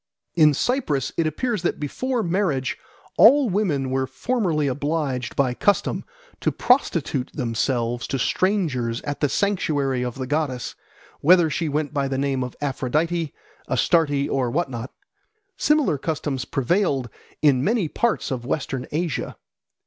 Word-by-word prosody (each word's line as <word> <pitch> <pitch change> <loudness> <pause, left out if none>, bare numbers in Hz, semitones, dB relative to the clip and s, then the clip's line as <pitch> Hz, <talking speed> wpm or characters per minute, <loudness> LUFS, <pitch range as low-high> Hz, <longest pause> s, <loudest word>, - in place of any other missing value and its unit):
In 155 -3 +5
Cyprus 200 - 0
it 165 - +1
appears 215 - -1
that 175 - -1
before 240 - -2
marriage 170 -8 0 0.4
all 260 0 +7
women 155 -10 0
were 130 0 0
formerly 160 - 0
obliged 140 -3 -2
by 130 -3 +2
custom 200 +10 +1 0.4
to - - +1
prostitute 165 - +1
themselves 120 -2 -1
to 135 - -1
strangers 130 - 0
at 145 0 -4
the 145 - +1
sanctuary 145 -9 0
of 125 -1 -4
the 130 -1 -4
goddess, 135 -4 -2 0.5
whether 170 0 +5
she 160 +2 -1
went 150 0 -2
by 140 -2 0
the 135 -1 -2
name 135 -1 0
of 125 - -6
Aphrodite, 150 +4 -1 0.4
Astarte, 145 +2 +2
or 130 -3 0
what 145 +1 -1
not. 120 +1 -5 0.6
Similar 300 - +2
customs 145 -4 -2
prevailed 135 - 0 0.4
in 135 -4 +4
many 210 -2 +1
parts 220 -1 -1
of 125 -3 -3
Western 130 -1 -3
Asia. 160 -3 -2
145 Hz, 140 wpm, -23 LUFS, 130-175 Hz, 0.6 s, all